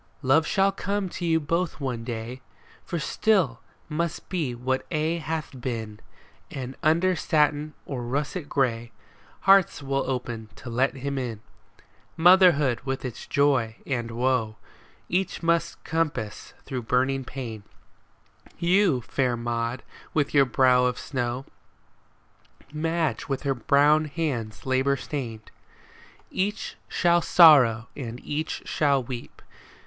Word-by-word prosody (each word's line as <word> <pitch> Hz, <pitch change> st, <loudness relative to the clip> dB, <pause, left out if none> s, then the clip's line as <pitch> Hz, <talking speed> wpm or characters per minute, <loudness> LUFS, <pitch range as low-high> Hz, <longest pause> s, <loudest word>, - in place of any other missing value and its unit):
Love 150 Hz, +5 st, +4 dB
shall 195 Hz, 0 st, +3 dB
come 200 Hz, -1 st, -2 dB
to 175 Hz, -, -5 dB
you 160 Hz, -1 st, +3 dB
both 165 Hz, +2 st, -1 dB
one 125 Hz, -5 st, -3 dB
day. 120 Hz, +2 st, -6 dB, 0.4 s
For 170 Hz, -, -4 dB
still 165 Hz, -, +1 dB, 0.3 s
must 165 Hz, +1 st, -3 dB
be 155 Hz, -10 st, -2 dB
what 130 Hz, +2 st, -1 dB
aye 160 Hz, +2 st, 0 dB
hath 155 Hz, -4 st, -4 dB
been; 110 Hz, -4 st, -4 dB, 0.5 s
And 130 Hz, 0 st, -6 dB
under 170 Hz, +4 st, +3 dB
satin 150 Hz, -1 st, +1 dB
or 130 Hz, -3 st, -4 dB
russet 145 Hz, +6 st, -3 dB
gray 120 Hz, -4 st, 0 dB, 0.5 s
Hearts 195 Hz, -6 st, +4 dB
will 135 Hz, -1 st, -1 dB
open 120 Hz, -4 st, -4 dB
to 120 Hz, -, -9 dB
let 130 Hz, +4 st, +1 dB
him 140 Hz, +1 st, -3 dB
in. 115 Hz, -4 st, -4 dB, 0.8 s
Motherhood 165 Hz, -7 st, +5 dB
with 135 Hz, 0 st, -3 dB
its 125 Hz, -, -7 dB
joy 135 Hz, -6 st, +2 dB
and 120 Hz, -4 st, -2 dB
woe 115 Hz, -2 st, 0 dB, 0.5 s
Each 180 Hz, -1 st, -1 dB
must 170 Hz, 0 st, 0 dB
compass 155 Hz, -10 st, -3 dB
through 130 Hz, -2 st, -4 dB
burning 130 Hz, +3 st, +1 dB
pain, 120 Hz, -5 st, -6 dB, 0.5 s
— -, -, -28 dB
You, 175 Hz, -6 st, +3 dB
fair 125 Hz, 0 st, -1 dB
Maud, 120 Hz, +1 st, -2 dB, 0.3 s
with 145 Hz, -3 st, +1 dB
your 140 Hz, -2 st, +6 dB
brow 125 Hz, 0 st, +4 dB
of 125 Hz, 0 st, 0 dB
snow, 125 Hz, 0 st, -3 dB, 1.3 s
Madge 160 Hz, 0 st, -1 dB
with 135 Hz, 0 st, -3 dB
her 140 Hz, -1 st, +1 dB
brown 145 Hz, +5 st, +3 dB
hands 140 Hz, -8 st, -3 dB
labor 130 Hz, +1 st, +2 dB
stained. 120 Hz, -7 st, -6 dB, 0.8 s
Each 205 Hz, +2 st, -2 dB
shall 175 Hz, -1 st, +3 dB
sorrow 130 Hz, -11 st, +6 dB
and 120 Hz, -3 st, -6 dB
each 150 Hz, +2 st, -3 dB
shall 140 Hz, -3 st, +1 dB
weep. 120 Hz, 0 st, -8 dB
135 Hz, 130 wpm, -26 LUFS, 125-160 Hz, 1.3 s, your